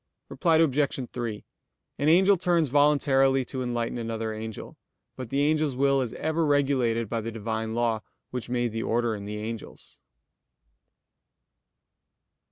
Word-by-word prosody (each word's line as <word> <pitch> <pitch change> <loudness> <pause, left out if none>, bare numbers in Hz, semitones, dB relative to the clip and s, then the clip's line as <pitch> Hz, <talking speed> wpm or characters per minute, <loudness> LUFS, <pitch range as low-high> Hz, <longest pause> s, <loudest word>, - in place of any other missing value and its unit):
Reply 165 -3 +2
Obj. 140 -4 +1
3: 115 -4 -4 0.5
An 145 - +2
angel 190 +4 +6
turns 170 -4 +1
voluntarily 135 -2 +3
to 130 +1 -5
enlighten 120 -1 -2
another 115 -1 -3
angel, 110 0 -7 0.4
but 130 -3 -7
the 140 +2 +1
angel's 155 -3 +1
will 140 +1 +2
is 120 -3 -3
ever 160 +1 -1
regulated 135 -6 +1
by 115 +2 -2
the 115 +1 -5
Divine 110 0 -3
law 115 -2 0 0.3
which 125 -2 -5
made 120 -1 0
the 115 +1 -3
order 115 0 0
in 100 -2 -6
the 105 +1 -5
angels. 110 +1 -8
125 Hz, 140 wpm, -26 LUFS, 115-145 Hz, 0.5 s, angel